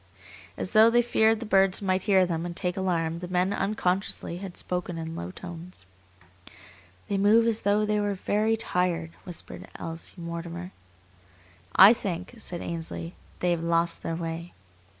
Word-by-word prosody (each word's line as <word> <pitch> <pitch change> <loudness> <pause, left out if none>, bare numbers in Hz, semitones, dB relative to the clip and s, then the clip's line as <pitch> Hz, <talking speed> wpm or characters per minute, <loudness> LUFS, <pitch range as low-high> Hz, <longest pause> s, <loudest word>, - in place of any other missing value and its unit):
As - - -4
though 220 +1 +7
they 240 +1 +4
feared 225 -2 +3
the 235 - -5
birds 195 -2 +3
might 190 -2 0
hear 190 -2 +4
them 165 -2 -2
and 175 0 -5
take 180 -2 -2
alarm, 170 -3 -1
the 180 - -6
men, 180 +2 +1
unconsciously, 195 -3 -1
had 190 -2 -8
spoken 180 -1 -3
in 165 0 -5
low 85 - -5
tones. 175 - -9 1.2
"They 200 - 0
move 215 +3 +5
as 230 -1 +1
though 205 +1 +2
they 210 0 +1
were 205 -1 0
very 215 +4 +1
tired," 180 -6 -1
whispered 175 -3 -5
Elsie 165 0 -6
Mortimer. 170 +1 -6 1.0
"I 195 +4 +10
think," 185 -2 -4
said 175 -5 -5
Ainsley, 90 - -5 0.3
"they 180 - +2
have 170 -1 0
lost 170 0 +1
their 165 - -3
way." 165 +1 -5
180 Hz, 160 wpm, -27 LUFS, 170-200 Hz, 1.2 s, I